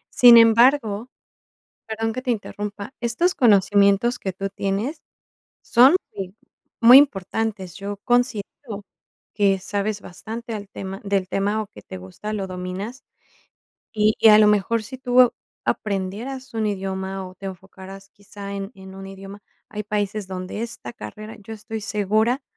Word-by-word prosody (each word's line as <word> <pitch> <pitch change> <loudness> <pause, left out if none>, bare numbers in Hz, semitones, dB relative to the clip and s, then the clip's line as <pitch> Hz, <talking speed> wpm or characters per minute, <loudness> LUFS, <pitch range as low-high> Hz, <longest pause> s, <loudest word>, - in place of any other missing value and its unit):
Sin 240 -1 +9
embargo, 230 -1 +4 0.8
perdón 225 0 -2
que 255 - -5
te 255 - -5
interrumpa, 205 0 -4
estos 295 +10 +1
conocimientos 200 0 +4
que 190 - -4
tú 195 +2 -4
tienes 200 +9 -3 0.6
son, 260 +8 +6 0.2
eh, 190 -2 -6 0.5
muy 240 +2 +9
importantes. 205 - 0
Yo 200 +1 -6
considero 240 -2 -1 0.5
que 200 -2 +3
sabes 205 +2 -2
bastante 225 +5 -7
al 205 -2 -7
tema 195 0 -7
del 200 -2 0
tema, 205 +3 0
o, 215 - -4
que - - -12
te - - -9
gusta, 95 - -7
lo 200 -2 -3
dominas, 185 +7 -6 0.9
y 215 0 +3
y 225 - +6
a 210 - +9
lo 215 - +6
mejor 210 +2 +2
si 260 +5 -9
tú 250 -1 +4 0.3
aprendieras 220 +7 -3
un 220 -1 0
idioma, 190 -1 -4
o, 185 - -14
te 195 +1 -7
enfocaras 190 +1 -11
quizá 200 0 -10
en 195 +1 -5
en 190 -1 -12
un 195 0 -9
idioma, 195 +1 -10 0.3
hay 210 -1 -6
países 205 0 -2
donde 185 +3 -6
esta 170 - -7
carrera 215 - -9
yo 210 +2 -9
estoy 220 0 -7
segura 215 +5 0
205 Hz, 150 wpm, -22 LUFS, 195-225 Hz, 0.9 s, Sin